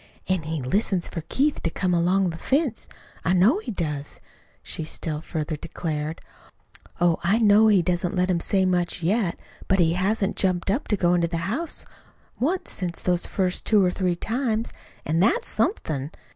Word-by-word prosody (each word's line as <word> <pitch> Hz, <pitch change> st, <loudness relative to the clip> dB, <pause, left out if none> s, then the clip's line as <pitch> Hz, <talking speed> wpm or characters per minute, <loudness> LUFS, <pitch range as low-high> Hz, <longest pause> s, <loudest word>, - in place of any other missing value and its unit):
"An' 185 Hz, -2 st, +1 dB
he 155 Hz, -2 st, -4 dB
listens 190 Hz, -, 0 dB
for 165 Hz, -, -5 dB
Keith 290 Hz, +2 st, +1 dB
to 165 Hz, -, 0 dB
come 180 Hz, +2 st, -1 dB
along 180 Hz, +2 st, +2 dB
the 165 Hz, -, -7 dB
fence 275 Hz, -, 0 dB, 0.4 s
I 170 Hz, -, +2 dB
know 205 Hz, -, +4 dB
he 435 Hz, -, -8 dB
does," 150 Hz, -8 st, -4 dB, 0.4 s
she 160 Hz, -, -4 dB
still 155 Hz, 0 st, -4 dB
further 155 Hz, -1 st, -3 dB
declared. 155 Hz, 0 st, -4 dB, 0.8 s
"Oh, 175 Hz, -2 st, +3 dB
I 195 Hz, +6 st, +3 dB
know 215 Hz, -1 st, +6 dB
he 200 Hz, -5 st, +5 dB
doesn't 180 Hz, +1 st, 0 dB
let 180 Hz, 0 st, +2 dB
him 175 Hz, -, +1 dB
say 190 Hz, +2 st, +1 dB
much 180 Hz, -1 st, 0 dB
yet, 195 Hz, 0 st, +1 dB, 0.3 s
but 190 Hz, -, +3 dB
he 165 Hz, -3 st, +3 dB
hasn't 195 Hz, +3 st, 0 dB
jumped 185 Hz, -1 st, +1 dB
up 245 Hz, +8 st, -1 dB
to 210 Hz, -, +1 dB
go 175 Hz, -1 st, +3 dB
into 170 Hz, -1 st, +2 dB
the 170 Hz, 0 st, -3 dB
house 285 Hz, -, -2 dB, 0.5 s
once 340 Hz, +9 st, -1 dB
since 175 Hz, -3 st, -4 dB
those 180 Hz, -1 st, +1 dB
first 185 Hz, -2 st, -1 dB
two 210 Hz, -3 st, +4 dB
or 180 Hz, -, +2 dB
three 180 Hz, -2 st, 0 dB
times, 225 Hz, +3 st, -2 dB, 0.3 s
an' 160 Hz, +2 st, +1 dB
that's 460 Hz, -, +2 dB
somethin'. 145 Hz, -, -1 dB
180 Hz, 180 wpm, -24 LUFS, 170-210 Hz, 0.8 s, know